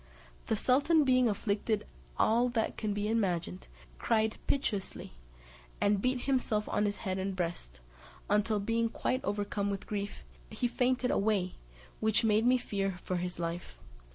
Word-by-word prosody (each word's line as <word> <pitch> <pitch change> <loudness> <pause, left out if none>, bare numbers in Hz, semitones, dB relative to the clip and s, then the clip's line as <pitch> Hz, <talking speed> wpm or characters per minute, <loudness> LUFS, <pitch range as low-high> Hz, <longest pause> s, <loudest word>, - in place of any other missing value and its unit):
The 220 - +2
sultan 285 +8 +3
being 255 -3 +4
afflicted 205 +1 -1 0.3
all 240 +3 +3
that 230 -2 -1
can 215 -2 -2
be 205 +1 -1
imagined, 175 - -1 0.3
cried 220 - +1
piteously, 205 - -2 0.7
and 200 -1 +2
beat 255 +1 +1
himself 240 -6 0
on 210 - +1
his 205 0 -1
head 190 0 -1
and 190 0 -2
breast, 165 - -4 0.5
until 210 +1 +2
being 230 +3 +1
quite 255 +3 -1
overcome 205 0 -1
with 200 -1 -3
grief, 205 -1 -4 0.3
he 245 - -1
fainted 250 +1 +1
away, 200 -3 +1 0.5
which 220 +1 +2
made 220 +1 +3
me 255 +1 +5
fear 195 -6 -2
for 185 - -1
his 180 0 -3
life. 170 +1 -5
210 Hz, 150 wpm, -31 LUFS, 195-235 Hz, 0.7 s, me